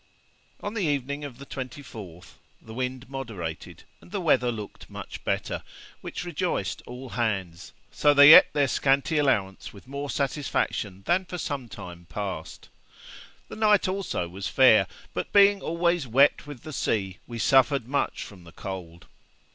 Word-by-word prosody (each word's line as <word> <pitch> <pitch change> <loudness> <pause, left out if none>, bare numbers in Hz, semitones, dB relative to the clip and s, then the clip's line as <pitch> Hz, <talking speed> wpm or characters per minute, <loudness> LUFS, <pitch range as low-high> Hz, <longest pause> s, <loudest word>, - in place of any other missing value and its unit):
On 205 - -3
the 225 - -2
evening 140 0 -2
of 135 -5 -7
the 140 - -10
24th, 115 - -8 0.3
the 110 - -12
wind 130 +1 -4
moderated 105 - -6 0.2
and - - -17
the 200 +2 -3
weather 135 -8 +2
looked 105 -3 -8
much - - -8
better, - - -2 0.4
which - - -6
rejoiced 170 - -2
all 125 +1 -8
hands, 95 -8 -3 0.2
so 150 - +2
that - - +1
they 145 +2 +10
ate - - +9
their 145 -2 +2
scanty 140 +4 +2
allowance 105 -10 0
with 100 +4 -15
more 140 +1 -5
satisfaction 130 -8 -2
than 185 +2 +2
for 180 - -6
some 140 -7 -4
time 85 -3 -10
past. 95 -2 -6 0.8
The - - -9
night 210 -2 +3
also 185 - -2
was 95 +3 -5
fair; - - +5 0.3
but 90 - -4
being 200 0 +6
always 170 -3 0
wet 140 +5 +3
with 145 -5 -9
the 155 - -8
sea, 95 -8 -1
we 120 - -7
suffered 135 +2 +3
much 140 +2 -1
from 95 -4 -12
the 85 - -14
cold. 85 -3 -8
130 Hz, 160 wpm, -26 LUFS, 100-145 Hz, 0.8 s, they